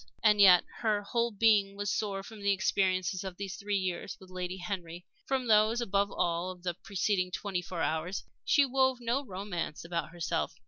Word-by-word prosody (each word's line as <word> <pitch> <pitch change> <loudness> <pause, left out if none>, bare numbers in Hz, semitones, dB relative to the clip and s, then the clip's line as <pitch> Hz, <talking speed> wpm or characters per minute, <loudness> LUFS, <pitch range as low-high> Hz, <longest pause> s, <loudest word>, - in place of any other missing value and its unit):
And 210 -2 +5
yet 180 -3 +8 0.2
her 210 -2 +1
whole 235 +3 0
being 205 -2 +3
was 205 -1 -1
sore 195 -2 -2
from 220 -1 -11
the 200 0 +2
experiences 185 -1 +1
of 190 -2 -6
these 195 -1 -5
three 205 -1 -1
years 185 -2 -3
with 185 -1 -15
Lady 185 0 -4
Henry 175 -2 -6 0.2
from 265 -2 0
those, 220 +1 +4
above 200 -3 0
all, 170 +1 0
of 180 -1 -9
the 175 -1 -1
preceding 190 +1 -1
twenty 185 0 -3
four 175 -1 -4
hours. 160 +5 -2 0.2
She 285 -2 +4
wove 260 0 +2
no 245 +4 -1
romance 185 - -5
about 170 -3 -3
herself. 165 -1 -2
195 Hz, 185 wpm, -30 LUFS, 180-210 Hz, 0.2 s, yet